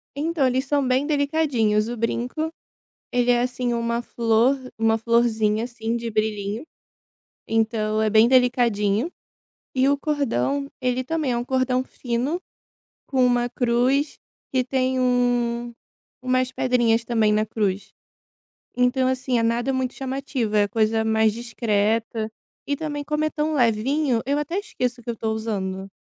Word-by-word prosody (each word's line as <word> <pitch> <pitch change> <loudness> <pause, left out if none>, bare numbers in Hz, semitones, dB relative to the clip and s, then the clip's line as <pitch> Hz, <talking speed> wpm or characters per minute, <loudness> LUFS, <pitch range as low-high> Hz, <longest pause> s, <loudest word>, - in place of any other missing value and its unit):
Então 310 0 0
eles 260 +2 0
são 285 0 +1
bem 255 +2 +2
delicadinhos 285 -8 +1
o 240 - -4
brinco, 250 +7 -2 0.6
ele 245 0 +2
é 240 0 +4
assim 250 -1 -1
uma 235 0 -1
flor, 235 +3 +2 0.2
uma 225 0 +2
florzinha 225 -1 +2
assim 235 -1 -3
de 235 0 -4
brilhinho, 215 +1 -2 0.8
então 220 -1 0
é 220 0 +2
bem 220 +2 +6
delicadinho, 245 - +2 0.7
e 260 +1 +3
o 280 0 +3
cordão 280 - -1
ele 250 0 0
também 310 -1 -1
é 240 - 0
um 240 - -3
cordão 255 0 +1
fino, 260 +6 -2 0.7
com 260 -2 +2
uma 245 -1 +2
cruz 250 +4 +1 0.3
que 260 - +2
tem 260 0 0
um 245 -1 +1 0.5
umas 255 0 +1
pedrinhas 240 -3 +2
também 225 -3 +2
na 215 0 +2
cruz. 205 -3 -2 0.9
Então 250 +1 +2
assim, 255 -2 0
nada 235 +3 0
muito 260 -1 -1
chamativo, 265 -4 -3
é 205 -1 +4
coisa 220 +1 +1
mais 220 -1 +3
discreta, 225 -1 -1 0.4
e 285 - 0
também 290 -1 -4
como 300 +1 -1
é - - +1
tão 310 0 -1
levinho, 250 +1 +1
eu 280 +2 +1
até 295 +5 -2
esqueço 250 - -3
que 235 - -9
eu - - 0
estou 220 0 -2
usando. 195 -4 -3
245 Hz, 145 wpm, -23 LUFS, 225-260 Hz, 0.9 s, bem